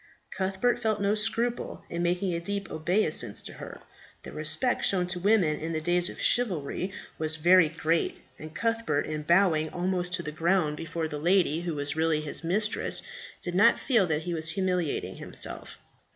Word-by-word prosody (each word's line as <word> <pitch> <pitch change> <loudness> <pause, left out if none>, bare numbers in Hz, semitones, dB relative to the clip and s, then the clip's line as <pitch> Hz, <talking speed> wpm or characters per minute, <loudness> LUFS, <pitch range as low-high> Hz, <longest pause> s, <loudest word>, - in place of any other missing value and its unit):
Cuthbert 195 +6 0
felt 220 -2 0
no 200 +1 +2
scruple 225 +3 -1
in 170 - -4
making 180 +2 0
a 170 - -1
deep 200 +3 -4
obeisance 160 +2 +1
to - - -8
her; - - -9 0.4
the - - -9
respect 155 +11 0
shown 185 -2 +2
to 180 0 -4
women 180 -6 +2
in 165 +1 -4
the 160 - -1
days 175 +2 +1
of - - -10
chivalry 185 - 0 0.3
was 155 0 -1
very 170 +1 +5
great, 165 +1 -1 0.2
and 155 +1 -10
Cuthbert 230 -6 0
in 155 0 -4
bowing 160 -1 +3
almost 180 +1 -1
to 170 - -4
the 150 - -5
ground 160 -1 +1
before 165 +1 -4
the 150 -1 -5
lady 170 -1 +2
who 170 -2 -3
was 145 +1 -1
really 160 -1 +1
his 150 +1 -5
mistress, 210 +6 +2 0.4
did 175 - -4
not 205 +6 +5
feel 225 -9 +2
that 155 -1 -1
he 175 0 -3
was 160 0 -2
humiliating 180 -3 -1
himself. - - -3
175 Hz, 180 wpm, -28 LUFS, 155-195 Hz, 0.4 s, very